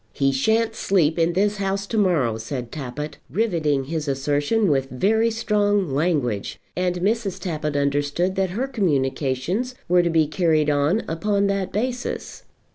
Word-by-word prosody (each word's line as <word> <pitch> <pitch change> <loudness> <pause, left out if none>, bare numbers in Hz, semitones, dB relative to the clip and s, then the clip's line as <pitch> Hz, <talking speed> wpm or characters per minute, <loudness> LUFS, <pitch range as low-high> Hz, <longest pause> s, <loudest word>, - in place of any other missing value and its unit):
"He 135 -1 +2
shan't 220 +12 +1
sleep 170 -7 +1
in 165 +1 +2
this 205 +3 +1
house 195 0 -1
to 225 - -5
morrow," 145 - +2
said 120 +1 -5
Tappitt, 150 +1 -6
riveting 160 - 0
his 155 +2 -4
assertion 145 +9 +1
with 135 -1 0
very 220 - +2
strong 205 -5 +1
language; 135 - -1 0.2
and 180 0 0
Mrs. 210 0 0
Tappitt 150 -5 -3
understood 145 +6 0
that 190 -1 +1
her 225 +9 -2
communications 165 - -1
were 180 0 +5
to 175 - 0
be 160 -2 +3
carried 155 -2 +2
on 145 +9 +1
upon 200 +5 0
that 195 -1 -1
basis. 245 +4 -3
170 Hz, 150 wpm, -23 LUFS, 145-205 Hz, 0.2 s, were